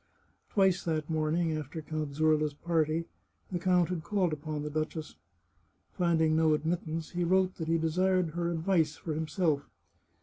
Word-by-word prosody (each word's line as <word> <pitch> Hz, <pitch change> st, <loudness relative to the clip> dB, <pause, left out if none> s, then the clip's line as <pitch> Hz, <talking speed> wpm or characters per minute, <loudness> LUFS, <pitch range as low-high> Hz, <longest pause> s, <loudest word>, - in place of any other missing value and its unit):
Twice 190 Hz, -3 st, +3 dB
that 155 Hz, -1 st, -1 dB
morning, 160 Hz, +1 st, +1 dB
after 155 Hz, +1 st, -5 dB
Count 155 Hz, -2 st, -4 dB
Zurla's 155 Hz, -1 st, +2 dB
party, 165 Hz, 0 st, 0 dB, 0.5 s
the 175 Hz, -, -1 dB
count 180 Hz, -1 st, +3 dB
had 175 Hz, -3 st, -3 dB
called 185 Hz, -2 st, +1 dB
upon 150 Hz, 0 st, -4 dB
the 150 Hz, -, -4 dB
duchess. 155 Hz, +1 st, -3 dB, 0.8 s
Finding 165 Hz, -3 st, +2 dB
no 160 Hz, -1 st, +4 dB
admittance, 160 Hz, 0 st, -3 dB
he 175 Hz, 0 st, -1 dB
wrote 185 Hz, +1 st, +2 dB
that 160 Hz, -, -4 dB
he 165 Hz, 0 st, +3 dB
desired 180 Hz, +2 st, +1 dB
her 170 Hz, +1 st, -1 dB
advice 165 Hz, -2 st, +1 dB
for 160 Hz, -, -5 dB
himself. 155 Hz, -1 st, 0 dB
160 Hz, 155 wpm, -30 LUFS, 155-175 Hz, 0.8 s, no